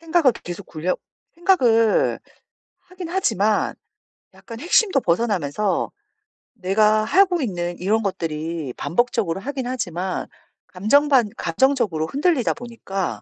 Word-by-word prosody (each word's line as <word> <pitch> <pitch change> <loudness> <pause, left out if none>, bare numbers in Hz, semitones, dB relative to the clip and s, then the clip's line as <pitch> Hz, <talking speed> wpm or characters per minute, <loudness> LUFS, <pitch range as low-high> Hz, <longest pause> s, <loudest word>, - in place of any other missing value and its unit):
생각을 330 -5 +3
계속 175 +2 -7
굴려 170 +3 -2 0.4
생각을 245 - +3 0.7
하긴 365 -2 -8
하지만 220 - +1 0.6
약간 230 -1 -11
핵심도 350 - +3
벗어나면서 185 -1 0 0.6
내가 215 +1 +2
하고 360 - +3
있는 175 -7 -3
이런 215 +4 +1
것들이 165 -5 -3
반복적으로 195 -3 0
하긴 260 +1 -4
하지만 185 -7 -3 0.4
감정 220 +11 +2
반 250 -6 +4
감정적으로 195 - +1
흔들리다 285 - +1
보니까 215 -6 -5
220 Hz, 275 characters per minute, -22 LUFS, 180-270 Hz, 0.7 s, 반